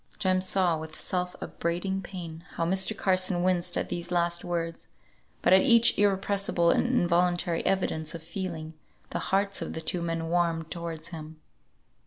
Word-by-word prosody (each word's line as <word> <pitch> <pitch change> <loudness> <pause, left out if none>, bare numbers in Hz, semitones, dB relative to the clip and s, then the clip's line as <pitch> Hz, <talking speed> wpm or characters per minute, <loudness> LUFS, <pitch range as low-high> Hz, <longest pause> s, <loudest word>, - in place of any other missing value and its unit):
Jem 185 -1 +1
saw 185 -3 +2
with 160 0 -8
self 180 -1 -2
upbraiding 180 +3 -2
pain 170 -4 -8
how 165 - 0
Mr. 190 +4 +3
Carson 185 -2 +2
winced 180 -1 +1
at - - -2
these 175 0 -3
last 170 0 +1
words, 165 -1 -3 0.6
but - - +5
at 190 - +7
each 235 +2 +6
irrepressible 195 -3 +2
and - - +2
involuntary 175 -6 +1
evidence 160 -4 0
of 165 - -7
feeling, 165 -2 -5 0.4
the - - -2
hearts 195 +1 +1
of - - -4
the 160 - -5
two 175 +2 -2
men 165 -1 -2
warmed 165 -1 0
towards 165 -2 -5
him. 160 -2 -9
175 Hz, 160 wpm, -28 LUFS, 165-190 Hz, 0.6 s, at